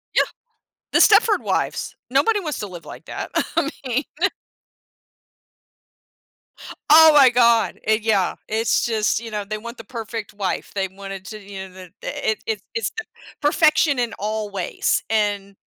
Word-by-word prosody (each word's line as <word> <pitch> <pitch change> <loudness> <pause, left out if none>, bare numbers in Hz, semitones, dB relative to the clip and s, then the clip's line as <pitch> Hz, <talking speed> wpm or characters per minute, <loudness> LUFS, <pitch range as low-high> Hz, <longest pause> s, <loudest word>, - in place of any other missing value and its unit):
Yeah. - - +5 0.7
The - - +4
Stepford 425 0 +5
Wives- - - -2
nobody 450 -2 +2
wants 305 -7 -4
to 210 - -4
live 175 -3 -10
like - - -11
that. - - -6 0.3
I 315 -3 +2 0.2
mean 255 +3 0 2.9
Oh 315 +1 +9
my 275 -3 +8
God, 235 -5 +3
eh 220 0 +3
yeah. 210 -4 +1
It's 225 +1 +1
just 220 -3 +1
you 230 -1 -8
know, 210 -1 -3
they 215 +2 -5
want 235 +3 -9
the - - -9
perfect 225 -2 -6
wife. 200 -3 -3
They 195 -1 0
wanted 195 0 -9
to, 215 +2 -8
you 195 -1 -8
know, - - -19
the 185 -2 -12
i - - -3
i - - -1
it's 215 -3 -2
it's 455 - -1
the 445 - -4 0.4
perfection 305 -1 +3
in 240 -2 -1
all 215 0 -3
ways. 190 -3 -1
And 205 -2 -1
220 Hz, 160 wpm, -22 LUFS, 200-255 Hz, 2.9 s, Oh